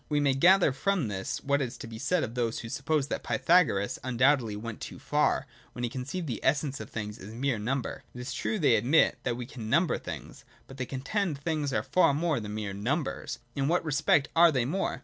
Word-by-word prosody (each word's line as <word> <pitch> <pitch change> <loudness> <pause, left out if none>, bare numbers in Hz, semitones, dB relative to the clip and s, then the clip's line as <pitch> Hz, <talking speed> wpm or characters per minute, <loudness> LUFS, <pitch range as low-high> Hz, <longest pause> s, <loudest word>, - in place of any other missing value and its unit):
We 150 -1 +2
may 140 -2 +3
gather 175 +4 +5
from 170 - 0
this, 95 -1 -3
what 140 0 +1
is 125 -3 -3
to - - -8
be 115 -1 -8
said 180 +6 +1
of 115 - -4
those 120 -2 -1
who 115 - -7
suppose 145 +2 0
that - - -2
Pythagoras 130 - +2
undoubtedly 125 -2 +2
went 110 +1 -7
too - - -7
far, - - +1 0.3
when 120 - -5
he 120 - -1
conceived 140 +8 -4
the 120 -7 -3
essence 140 0 +1
of - - -8
things 105 -1 -5
as 100 - -9
mere 130 -2 0
number. 125 +5 -3
It - - -7
is 125 +1 -5
true, 220 - -1
they 145 - +4
admit, 140 +7 +3
that 120 -2 -2
we 125 - -5
can 115 -3 -8
number 170 +7 +2
things; - - -8 0.2
but, 135 - -12
they 130 -2 -3
contend, 150 +5 -2
things 150 -1 -2
are 135 - 0
far 180 -6 +3
more 160 -2 +1
than 105 -1 -6
mere 105 -2 -3
numbers. 130 - -2 0.2
But 140 - -3
in 135 - +1
what 170 +1 +1
re 155 - -2
spect 135 0 +3
are 170 0 +7
they 130 -5 +1
more? 185 +9 -1
135 Hz, 230 wpm, -29 LUFS, 115-155 Hz, 0.3 s, are